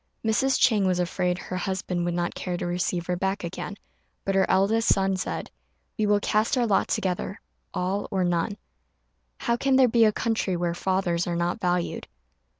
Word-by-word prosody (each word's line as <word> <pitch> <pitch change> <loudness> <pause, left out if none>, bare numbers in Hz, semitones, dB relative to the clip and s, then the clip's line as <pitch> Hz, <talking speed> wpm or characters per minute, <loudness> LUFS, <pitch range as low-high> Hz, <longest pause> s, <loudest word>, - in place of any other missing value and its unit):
Mrs. 260 +5 +2
Chang 210 -6 +4
was 180 -1 +2
afraid 180 0 0
her 185 0 -5
husband 185 -1 -2
would 175 0 -1
not 175 0 -1
care 180 -1 -3
to - - -3
receive 175 0 -1
her 180 - -1
back 190 +2 -2
again; 180 +3 -5 0.5
but 195 - 0
her 190 0 +2
eldest 215 +4 +3
son 195 0 +2
said, 185 - -4 0.4
"We 215 -2 0
will 205 0 +4
cast 215 +5 +1
our 245 - +3
lot 205 -4 +2
together; 185 +1 -2 0.3
all 190 +3 -2
or 190 -2 0
none. 175 -1 0 0.8
How 235 - +1
can 270 +1 +2
there 260 -1 +6
be 230 -1 +4
a 215 - +5
country 215 -5 -1
where 170 0 -1
fathers 180 -1 0
are 175 - -1
not 175 +1 -1
valued?" 180 -1 -1
190 Hz, 185 wpm, -26 LUFS, 175-210 Hz, 0.8 s, there